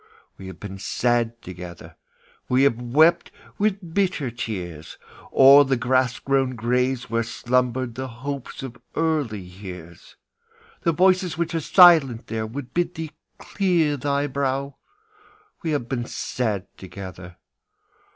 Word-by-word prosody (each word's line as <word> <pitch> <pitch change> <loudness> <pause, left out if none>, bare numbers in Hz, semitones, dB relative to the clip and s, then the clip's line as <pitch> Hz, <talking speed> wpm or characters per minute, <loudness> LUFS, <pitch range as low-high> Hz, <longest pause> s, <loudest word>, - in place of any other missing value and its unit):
We 95 - -10
have 95 - -10
been 95 -1 -8
sad 120 +2 0
together; 90 -1 -10 0.5
We 130 +2 +3
have 120 -4 +2
wept 155 +8 +3 0.3
with 200 -5 -1
bitter 180 -10 0
tears 90 -9 -6 0.3
O'er 140 +2 +8
the 135 -1 +1
grass 125 0 +1
grown 135 -2 0
graves 125 +2 0
where 115 0 +1
slumbered 125 +1 -1
The 130 +2 -5
hopes 135 +3 -6
of 125 -2 -7 0.2
early 150 -10 0
years. 90 -2 -11 0.7
The 170 - +2
voices 185 0 +2
which 170 0 -2
are 165 - 0
silent 160 - +6
there 110 -1 -3
Would 125 +2 -8
bid 175 0 -1
thee 160 -1 -5 0.3
clear 175 -7 +1
thy 140 +1 -1
brow; 140 0 -2 0.8
We 165 - -3
have 145 -6 -1
been 120 -1 -3
sad 110 -6 -3
together. 90 -2 -9
130 Hz, 130 wpm, -23 LUFS, 115-145 Hz, 0.8 s, O'er